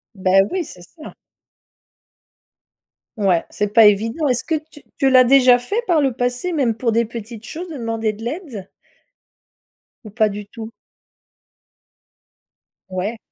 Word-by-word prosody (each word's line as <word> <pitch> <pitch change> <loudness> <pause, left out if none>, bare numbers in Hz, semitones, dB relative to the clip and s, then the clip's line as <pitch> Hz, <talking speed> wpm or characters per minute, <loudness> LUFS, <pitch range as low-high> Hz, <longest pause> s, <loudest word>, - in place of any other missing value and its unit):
Beh 190 0 +3
oui, 370 -2 -1
c'est 180 - -12
ça. 310 - -13 2.0
Ouais, 190 -5 +2
c'est 210 - -1
pas 225 0 +7
évident. 225 +9 +2
Est-ce 250 -1 0
que 320 - -1 0.2
tu 295 - -14 0.2
tu 270 - +2
l'as 255 -1 +7
déjà 250 -1 +5
fait 410 - -2
par 330 -4 +2
le 270 -3 +1
passé, 245 +8 -2
même 265 -8 +1
pour 230 -1 -1
des 230 +1 +1
petites 230 0 -9
choses, 345 +2 -7
de 310 - -7
demander 225 -2 -2
de 215 +2 -11
l'aide 245 - -6 1.4
ou 215 - -9
pas 215 -1 +2
du 205 0 -7
tout? 225 +1 -9 2.2
Ouais. 190 +5 -3
235 Hz, 145 wpm, -20 LUFS, 215-275 Hz, 2.2 s, pas